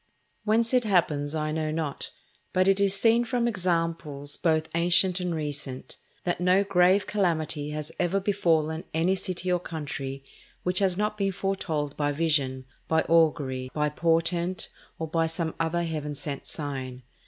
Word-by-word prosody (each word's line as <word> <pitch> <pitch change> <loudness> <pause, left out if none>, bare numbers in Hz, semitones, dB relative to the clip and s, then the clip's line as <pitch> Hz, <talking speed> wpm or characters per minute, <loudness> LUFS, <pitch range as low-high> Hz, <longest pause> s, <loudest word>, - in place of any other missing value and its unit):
Whence 225 +3 +2
it 250 -1 +4
happens 160 -7 +1
I 155 0 -1
know 155 0 -1
not, 155 -2 -3 0.4
but 185 +1 +3
it 195 0 +4
is 200 -1 +3
seen 230 +3 +4
from 240 0 0
examples 165 -7 -1
both 160 -2 +1
ancient 175 +2 +4
and 180 -2 -1
recent, 145 -4 -4 0.3
that 175 0 -1
no 180 +2 +4
grave 190 +1 +4
calamity 160 -7 0
has 150 0 -5
ever 180 +2 +2
befallen 165 -5 +1
any 170 +4 +3
city 185 -1 -2
or 180 - +2
country 140 -5 -5 0.4
which 180 +1 +1
has 190 -3 +2
not 210 +1 -1
been 195 -1 +1
foretold 175 -7 -2
by 145 -1 +1
vision, 140 -4 0 0.2
by 160 0 +3
augury, 145 -6 +2
by 150 0 +1
portent, 170 +3 0 0.3
or 160 - -3
by 165 +1 +1
some 165 0 -2
other 165 +1 0
Heaven 150 -3 -3
sent 140 -1 -5
sign. 130 -4 -5
165 Hz, 155 wpm, -27 LUFS, 150-185 Hz, 0.4 s, it